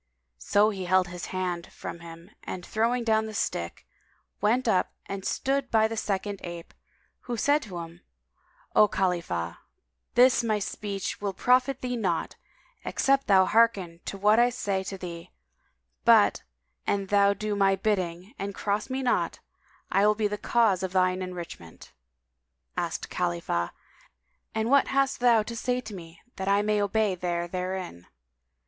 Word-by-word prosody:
So 205 - +3
he 190 -3 -5
held 185 0 +3
his 180 0 -6
hand 180 -2 -3
from - - -7
him 165 0 -12
and 180 - -6
throwing 235 +3 0
down 220 -1 +2
the 215 - -7
stick, 85 - -3 0.6
went 235 +5 +2
up 190 -5 +3
to - - -16
and 195 -1 -5
stood 270 +3 -1
by 220 -1 +4
the 225 - -5
second 200 -1 -2
ape, 170 -1 -8 0.5
who 240 -1 -2
said 290 +6 +3
to 195 -9 -8
him, 170 +1 -8 0.7
"O 210 - +7
Khalifah, 170 - -1 0.6
this 250 0 +5
my 220 -2 +1
speech 200 -1 -4
[FN#191] - - -32
will 200 -1 -2
profit 255 +5 +2
thee 250 -1 -2
naught, 185 -8 -1 0.5
except 275 -1 +1
thou 190 -3 +6
hearken 200 -7 +2
to 195 - -5
what 210 +3 +4
I 240 +1 +5
say 200 -6 -2
to 195 - -5
thee; 170 -2 -8 0.7
but, - - +5 0.5
an 200 -1 +1
thou 200 0 +3
do 210 +1 -2
my 195 -1 +3
bidding 185 -1 -2
and 200 0 -4
cross 205 +4 -1
me 260 +1 -2
not, 250 - +1 0.5
I 200 +2 +4
will 210 - +4
be 215 -1 +1
the 205 - -3
cause 220 -6 +2
of 190 -1 -3
thine 185 0 +2
enrichment." 175 - -8 0.8
Asked - - -3
Khalifah, 85 0 -1 0.8
"And 220 +2 0
what 280 0 +5
hast 275 0 +1
thou 235 -3 +5
to 230 +2 -7
say 250 +2 -1
to 215 -3 -9
me 170 -3 -10 0.2
that 190 0 -4
I 200 +1 +3
may 210 0 +1
obey 205 0 +1
there 175 -1 -2
therein?" 180 - -5
200 Hz, 165 wpm, -27 LUFS, 180-225 Hz, 0.8 s, O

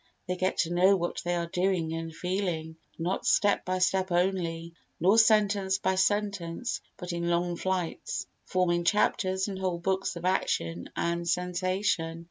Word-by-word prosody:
They 180 - -1
get 185 +1 -1
to 170 0 -2
know 185 +3 +5
what 175 -2 -2
they 175 0 0
are 170 -1 -1
doing 175 -2 0
and 165 0 -4
feeling, 170 -2 -3 0.2
not 175 +3 -2
step 205 -2 +3
by 185 0 0
step 185 +1 +1
only, 175 -2 0 0.3
nor 195 +7 +5
sentence 205 -3 +4
by 190 0 0
sentence, 200 +1 -1 0.2
but 180 -2 -5
in 170 0 -1
long 175 0 +1
flights, 185 -1 -2 0.2
forming 175 -2 +1
chapters 190 +1 +1
and 195 -2 -5
whole 185 -2 -1
books 190 +2 -1
of 170 +1 -6
action 85 - -1
and 170 0 -1
sensation. 180 -2 0
180 Hz, 155 wpm, -28 LUFS, 170-190 Hz, 0.3 s, know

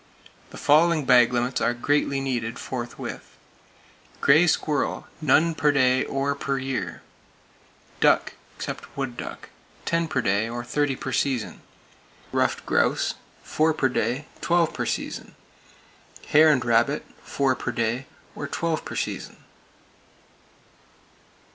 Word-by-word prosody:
The - - -11
following 155 0 +4
bag 125 -2 +6
limits 125 +1 -1
are 120 - +1
greatly 140 +2 +1
needed, 120 -4 -2
forthwith: 120 -2 -6 0.8
Gray 155 +5 +5
Squirrel, 150 -3 0 0.2
none 155 +3 +4
per 150 -1 +2
day, 130 -2 +3
or 135 +1 -1
per 140 -1 -2
year; 130 -10 -4 1.0
duck - - +3 0.2
(except - - -7
wood 135 -3 -3
duck), - - -8 0.4
ten 165 0 +1
per 130 -4 0
day, 100 +1 +1
or 120 +1 -4
thirty 145 +2 0
per 135 - -5
season; 130 -2 -1 0.7
ruffed - - 0
grouse, - - +1 0.3
four 155 0 +1
per 130 - +2
day, 125 +4 -1 0.2
twelve 170 -1 +2
per - - -3
season; - - -4 0.9
hare 155 +1 +7
and 130 -6 +2
rabbit, 120 +5 +2 0.2
four 135 -2 0
per 125 - -3
day, 120 +3 -2 0.3
or 145 - -5
twelve 165 0 -2
per - - -7
season. - - -4
135 Hz, 125 wpm, -25 LUFS, 120-150 Hz, 1.0 s, hare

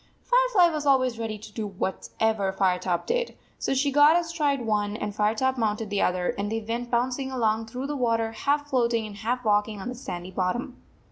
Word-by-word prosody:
Firefly - - +4
was 300 -2 -2
always 255 -4 +3
ready 220 -2 -3
to 215 +1 -12
do 220 -2 -3
whatever 200 +1 -1
Firetop 180 -2 0
did, 485 0 -1 0.2
so - - 0
she 280 +2 +2
got 295 +4 +6
astride 310 -5 0
one, 210 -1 0
and 210 -2 -4
Firetop 225 +5 +1
mounted 215 -1 -1
the 205 - +1
other, 180 0 +1
and 205 +1 -2
they 225 - 0
went 230 +2 -4
bouncing 255 +3 0
along 225 -3 0
through 250 +4 -5
the 295 +1 -3
water, 230 -3 +1
half 290 +5 0
float 240 -4 +1
ing 225 -1 0
and 205 -1 -9
half 245 +3 -2
walking 210 0 +1
on 195 - -5
the - - -4
sandy 180 -7 -6
bottom. 185 +6 -2
230 Hz, 200 wpm, -26 LUFS, 210-265 Hz, 0.2 s, got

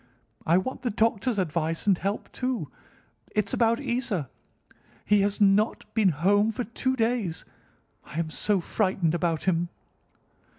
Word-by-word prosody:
I 170 +2 +5
want 225 +8 -2
the 245 - -1
doctor's 225 +1 +1
advice 165 -2 -1
and 200 -2 +5
help, 195 +4 -3
too. 250 - -3 0.6
It's 210 -1 0
about 230 0 +3
Isa. 235 - -2 0.7
He 205 -1 +4
has 200 +1 0
not 205 +2 +3
been 215 -4 +4
home 200 +7 +3
for 245 - -3
two 260 +3 -1
days. 225 -7 -1 0.6
I - - -9
am 165 -1 -1
so 200 +3 0
frightened 185 -3 0
about 170 -2 0
him!" 175 -2 +1
200 Hz, 140 wpm, -27 LUFS, 170-225 Hz, 0.7 s, I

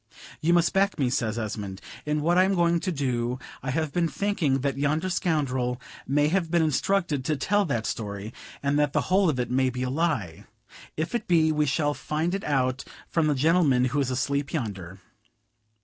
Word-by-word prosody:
"You 165 - +2
must 170 0 +3
back 195 +1 +2
me," 130 -4 +1
says 115 -3 -1
Esmond, 105 -4 -4 0.3
"in 150 0 0
what 170 +3 +2
I 185 - +6
am 195 +1 +2
going 170 -1 +3
to 185 - -2
do. 125 -5 -1 0.2
I 130 - -4
have 155 +2 -1
been 175 -1 +2
thinking 160 -7 0
that 140 0 -1
yonder 155 +6 0
scoundrel 130 -8 0 0.3
may 145 +2 +3
have 175 -1 0
been 170 -1 +3
instructed 155 0 0
to 155 - +1
tell 205 +9 +1
that 120 -8 -1
story, 105 0 -4 0.3
and 140 +1 +2
that 145 -1 +1
the - - +2
whole 190 -2 +4
of 135 -5 -1
it 125 -1 -2
may 130 +1 +2
be 125 0 -4
a 125 - -2
lie; 135 - -1 0.5
if 155 +7 -2
it 240 - -2
be, 160 -3 +4
we 150 -1 +1
shall 145 +1 +1
find 155 +4 -2
it 195 - -2
out 130 -2 0 0.3
from 165 -2 +1
the 150 - +2
gentleman 145 -3 +3
who 145 - +1
is 135 -2 0
asleep 140 +2 -1
yonder. 100 - -4
145 Hz, 200 wpm, -26 LUFS, 125-170 Hz, 0.5 s, I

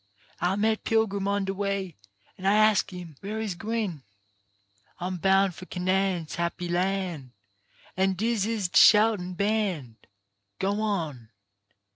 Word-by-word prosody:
I 180 +2 +1
met 220 +2 +1
a - - -39
pilgrim 200 -3 0
on 200 0 0
de 195 - -2
way, 195 -3 -2 0.4
an' 190 - -4
I 200 - +5
ask 215 -2 +4
him 175 -5 -9
where 210 +3 -5
he's 215 -4 -2
gwine. 205 -4 -3 1.0
"I'm 180 +1 -3
bound 195 +1 +3
for 185 +2 -11
Canaan's 185 -3 -1
happy 170 +1 -2
Ian', 180 -7 -2 0.6
An' 190 +1 +2
dis 220 +1 0
is 220 -4 -1
de - - +5
shoutin' 210 -4 +5
band. 185 - -2 0.5
Go 200 +2 -1
on. 160 - -3
195 Hz, 140 wpm, -27 LUFS, 180-210 Hz, 1.0 s, I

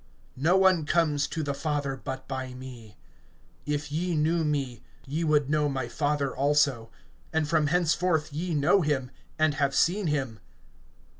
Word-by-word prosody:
No 175 +6 +4
one 185 -5 +3
comes 150 -4 +2
to 160 - -3
the 140 -1 -2
Father, 145 -2 -2
but 130 0 -7
by 130 -1 -5
me. 120 -5 -11 0.7
(7)If 145 0 -2
ye 170 +3 -1
knew 160 +2 +1
me, 140 -5 -2 0.2
ye 150 +5 -2
would 150 -3 +2
know 150 0 +1
my 135 -1 -3
Father 145 -3 -1
also; 140 -4 +2 0.4
and 160 -1 0
from 155 -1 +2
henceforth 165 -2 +1
ye 165 +2 -2
know 150 +7 +4
him, 135 -5 -1 0.3
and 155 -1 +3
have 140 -1 0
seen 185 +2 +2
him. 135 -7 -2
150 Hz, 155 wpm, -27 LUFS, 135-160 Hz, 0.7 s, No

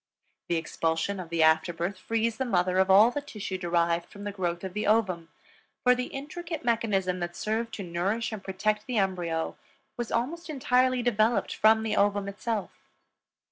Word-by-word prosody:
The 170 - +2
expulsion 165 +4 -1
of 175 -3 -7
the 165 -1 +2
after 160 +2 +4
birth 175 +3 -3
frees 225 +1 -1
the 265 - 0
mother 185 -6 +1
of 190 0 +3
all 210 +5 +7
the 290 - -3
tissue 210 -9 -5
derived 170 -1 0
from 205 - -11
the 205 - -3
growth 175 -3 -3
of 190 -1 -5
the 210 0 -2
ovum, 185 -7 +1 0.5
for 250 - +6
the 250 0 -2
intricate 315 +2 -6
mechanism 200 -6 +1
that 175 0 -4
served 225 +2 -2
to 200 - -5
nourish 190 +7 -1
and 215 -3 -6
protect 210 +3 -1
the 250 -3 -1
embryo 175 -5 -1 0.4
was 240 -2 -4
almost 320 +9 -2
entirely 255 -3 +2
developed 230 -1 +2
from 220 +1 +4
the 220 - -1
ovum 200 0 +2
itself. 205 +1 -3
205 Hz, 180 wpm, -28 LUFS, 180-230 Hz, 0.5 s, all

